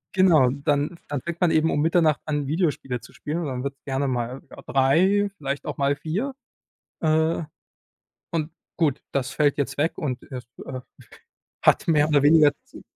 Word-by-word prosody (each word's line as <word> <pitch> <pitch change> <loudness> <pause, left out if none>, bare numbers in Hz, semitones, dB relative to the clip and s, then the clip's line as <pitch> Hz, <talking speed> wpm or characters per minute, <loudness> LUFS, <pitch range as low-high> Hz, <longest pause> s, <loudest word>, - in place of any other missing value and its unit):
Genau, 165 -9 +5
dann 145 +4 -1
dann 145 -3 -3
fängt 170 +1 -6
man 175 - +4
eben 160 +1 +3
um 145 - +1
Mitternacht 160 -2 +3
an, 145 -2 -2
Videospiele 145 -6 -1
zu 120 - -15
spielen 155 +3 -4
und 170 - -3
dann 130 -1 -4
wird's 140 -1 -6
gerne 135 0 -1
mal, 125 +1 -3
ja, - - -12
3:00 185 +10 +3
vielleicht 140 -1 -4
auch - - -5
mal 140 0 +2
4:00, 185 - -3 0.7
äh, 160 +1 +2 0.9
und 160 -1 -2 0.3
gut, 150 -5 +1
das 135 -1 -1
fällt 145 -1 +2
jetzt 135 -1 -2
weg 160 +3 +2
und, 130 -5 -3
äh, 130 - -6
f 125 - -10 0.2
äh, 130 - -5 0.8
hat - - +3
mehr 150 -3 +4
oder 145 -2 +3
weniger 150 0 +6
z - - -14
145 Hz, 180 wpm, -24 LUFS, 135-160 Hz, 0.9 s, weniger